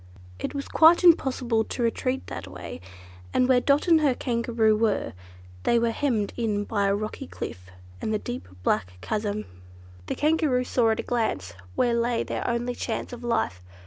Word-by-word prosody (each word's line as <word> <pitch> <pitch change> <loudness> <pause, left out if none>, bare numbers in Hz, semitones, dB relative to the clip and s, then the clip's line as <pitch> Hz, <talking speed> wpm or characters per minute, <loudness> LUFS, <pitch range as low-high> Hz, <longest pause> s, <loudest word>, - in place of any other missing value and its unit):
It - - -4
was 280 - -4
quite 330 +3 +6
impossible 255 -9 +4
to 245 - -3
retreat 255 +3 -1
that 100 - -7
way; 90 -2 -8 0.5
and 250 - +4
where 255 -1 +4
Dot 280 +5 +2
and 325 -2 +6
her 280 -4 +3
Kangaroo 230 -3 +1
were, 215 -1 0 0.5
they 235 - +3
were 235 0 +2
hemmed 225 -6 0
in 215 -4 -1
by 205 -1 0
a 200 - +2
rocky 215 - -5
cliff 90 +1 -7 0.3
and - - -2
the 215 - +2
deep 120 - -6 0.2
black 90 0 0
chasm. 210 - -2 0.6
The - - -2
Kangaroo 300 -4 +2
saw 240 -2 +2
at 220 - +1
a - - -1
glance 95 - -1 0.2
where 240 - +2
lay 235 0 +1
their - - -3
only 240 +1 -1
chance 245 - -4
of 245 0 -8
life. 225 - -1
235 Hz, 175 wpm, -26 LUFS, 210-255 Hz, 0.6 s, quite